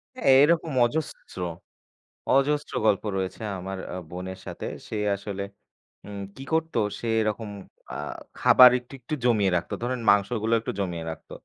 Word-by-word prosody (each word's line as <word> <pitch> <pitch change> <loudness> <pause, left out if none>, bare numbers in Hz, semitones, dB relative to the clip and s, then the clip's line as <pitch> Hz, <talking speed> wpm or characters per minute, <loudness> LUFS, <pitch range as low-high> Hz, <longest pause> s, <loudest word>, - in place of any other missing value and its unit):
হ্যাঁ, 245 - +1
এরকম 165 0 +2
অজস্র, 150 -5 -4 1.0
অজস্র 145 +2 +1
গল্প 105 -1 +3
রয়েছে 95 +3 -3 0.2
আমার 95 +1 -5 0.2
আ - - -4
বোনের 95 +1 -6
সাথে। - - -6 0.2
সে - - -5 0.2
আসলে 100 0 -5 0.6
উম 100 -1 -7 0.2
কী 135 - -8
করত? 160 0 0 0.2
সে 120 - -6
এরকম 110 0 -1 0.4
আ - - -4 0.4
খাবার 125 -1 +9
একটু, 125 +2 -16
একটু 125 +5 -4
জমিয়ে 105 -6 +3
রাখত। 85 - -3
ধরেন 125 0 -1
মাংসগুলো 110 +2 +2
একটু - - -4
জমিয়ে 85 -3 -3
রাখত। 80 - -10
110 Hz, 145 wpm, -26 LUFS, 95-130 Hz, 1.0 s, খাবার